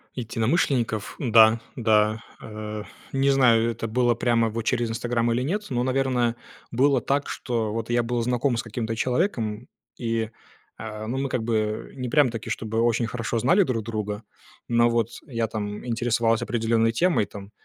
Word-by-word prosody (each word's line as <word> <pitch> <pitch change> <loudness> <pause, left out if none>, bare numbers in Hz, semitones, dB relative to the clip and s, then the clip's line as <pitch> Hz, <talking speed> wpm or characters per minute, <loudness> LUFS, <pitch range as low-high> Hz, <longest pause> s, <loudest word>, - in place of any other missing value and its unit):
Единомышленников. 115 - 0
Да, 115 -3 +6 0.2
да. 110 -2 +2 0.2
Э. 105 -1 -6 0.3
Не 135 +1 +2
знаю, 115 -4 +4
это 115 - -4
было 120 +1 +2
прямо 115 -1 +2
во 115 +1 -4
через 120 +1 0
"Инстаграм" 120 +1 0
или 120 +2 +1
нет, 205 +9 -2
но, 125 -2 0
наверное, 130 -2 +1 0.4
было 135 +1 +3
так, 140 +1 0
что 115 -4 -2
вот 115 0 -4
я 120 0 +2
был 120 0 -1
знаком 125 +1 0
с 115 - -2
каким-то 115 0 -3
человеком. 120 - -1 0.3
И, 115 -1 -1 0.5
э, 110 -1 -6
ну, 125 +4 -2
мы 135 0 -1
как 125 -3 -1
бы 110 -2 -1
не 125 -2 -4
прямо-таки, 120 -6 +2
чтобы 110 0 -2
очень 115 0 +2
хорошо 115 0 -2
знали 155 - +4
друг 120 -9 -2
друга. 105 -1 -4 0.4
Но 120 0 +4
вот 115 -1 +1 0.2
я, 115 -4 -1
там, 105 0 -5
интересовался 115 -1 +1
определенной 115 -1 +1
темой, 170 - +2
там. 100 0 -11
115 Hz, 165 wpm, -25 LUFS, 110-125 Hz, 0.5 s, Да